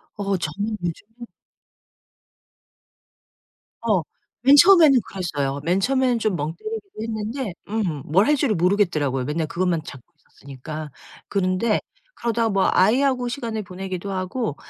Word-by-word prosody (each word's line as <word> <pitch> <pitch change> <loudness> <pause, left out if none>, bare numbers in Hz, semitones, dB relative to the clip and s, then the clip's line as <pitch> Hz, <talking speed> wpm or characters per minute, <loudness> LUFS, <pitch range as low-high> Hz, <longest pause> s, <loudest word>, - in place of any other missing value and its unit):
어 200 -2 -1
저는 200 +7 -3
요즘에 225 +8 -6 2.6
어. 210 -6 +2 0.4
맨 275 +3 +7
처음에는 325 -6 +7
그랬어요. 145 -7 -3
맨 175 +4 +1
처음에는 255 +2 +2
좀 215 -4 0
멍 155 +1 -3
때리기도 430 - -7
했는데 220 0 -4 0.2
음 195 -9 -2
뭘 185 +7 +3
할 300 - +4
줄을 265 -6 +1
모르겠더라고요, 170 -8 +1
맨날 155 +3 -2
그것만 175 0 0
잡고 130 -3 -12
있었으니까. 150 +3 -9 0.4
그런데 195 +3 +1 0.4
그러다 230 -1 0
뭐 195 -2 +2
아이하고 250 +5 +3
시간을 230 -3 -4
보내기도 190 0 -6
하고 185 - -3
200 Hz, 300 characters per minute, -23 LUFS, 170-235 Hz, 2.6 s, 맨